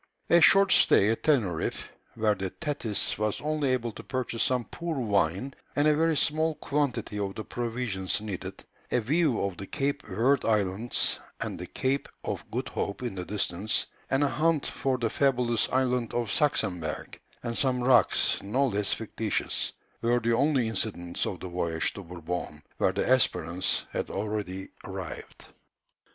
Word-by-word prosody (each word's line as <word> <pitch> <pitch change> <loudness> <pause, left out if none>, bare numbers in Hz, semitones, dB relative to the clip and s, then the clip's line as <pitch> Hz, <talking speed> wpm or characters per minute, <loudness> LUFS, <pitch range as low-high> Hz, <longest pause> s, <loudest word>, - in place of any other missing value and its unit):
A 170 - +7
short 195 +2 +7
stay 100 - +6
at 115 - -2
Teneriffe, 110 - 0 0.3
where 110 -2 +2
the 95 -1 -3
Thetis 140 - -2
was 105 -1 0
only 150 -2 0
able 120 -2 0
to - - -9
purchase 125 -3 -3
some 125 -2 +1
poor 170 -4 -4
wine 100 +2 +1 0.2
and 145 +1 +3
a 150 - +5
very 160 0 +2
small 155 +3 +2
quantity 140 -9 -1
of 100 -1 -2
the 110 - -4
provisions 115 -7 -2
needed; 105 -4 -6 0.3
a 125 - +3
view 140 +2 +2
of 100 -2 -2
the 95 - -7
Cape 140 0 -1
Verd 115 +8 +2
Islands 105 +1 +1 0.2
and - - -3
the - - -5
Cape 135 +2 -1
of - - -4
Good - - -3
Hope 100 +5 -3
in 120 - -2
the 90 -2 -5
distance, 105 0 0 0.2
and 135 +2 +2
a - - +4
hunt 155 +1 +1
for 135 -1 -1
the 120 -2 0
fabulous 125 -5 +2
island 125 -3 +1
of 120 -4 -1
Saxemberg, 90 - -1 0.2
and 115 -1 -3
some 125 -1 +2
rocks 125 -7 +4
no 125 +8 +1
less 105 -2 -1
fictitious, 110 -1 -2 0.3
were 120 +1 +3
the 115 0 +1
only 135 -2 +2
incidents 95 -5 -2
of 90 - -5
the - - -5
voyage 85 -2 -1
to 100 - -7
Bourbon, 85 -3 -5 0.2
where - - +3
the 95 - -1
Espérance 95 -8 +2
had - - -3
already 100 -2 -3
arrived. - - -7
115 Hz, 165 wpm, -28 LUFS, 100-135 Hz, 0.3 s, A